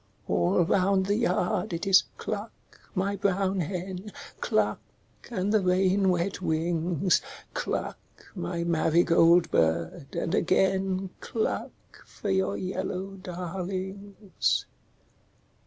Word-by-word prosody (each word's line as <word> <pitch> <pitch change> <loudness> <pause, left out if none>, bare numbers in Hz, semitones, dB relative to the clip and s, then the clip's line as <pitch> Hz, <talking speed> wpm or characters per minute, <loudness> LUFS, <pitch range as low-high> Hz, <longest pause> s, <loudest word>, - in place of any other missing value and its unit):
All 90 - +3
round 190 +2 +2
the 200 +1 +1
yard 185 -4 0
it 170 +4 -3
is 195 -1 +6
cluck, 215 +1 -4 0.4
my 200 +2 0
brown 195 0 0
hen, 185 +3 -4 0.3
Cluck, - - +1 0.5
and 205 -3 -1
the 215 - +4
rain 190 +1 +3
wet 180 +2 0
wings, 170 +1 +1 0.3
Cluck, - - -3 0.3
my 130 - -3
marigold 170 +1 +4
bird, 80 - 0
and 165 - -1
again 190 -1 +1
Cluck 225 - -2 0.3
for 205 - -5
your 190 0 +1
yellow 185 +1 -3
darlings. 190 +2 -3
185 Hz, 105 wpm, -27 LUFS, 170-195 Hz, 0.5 s, is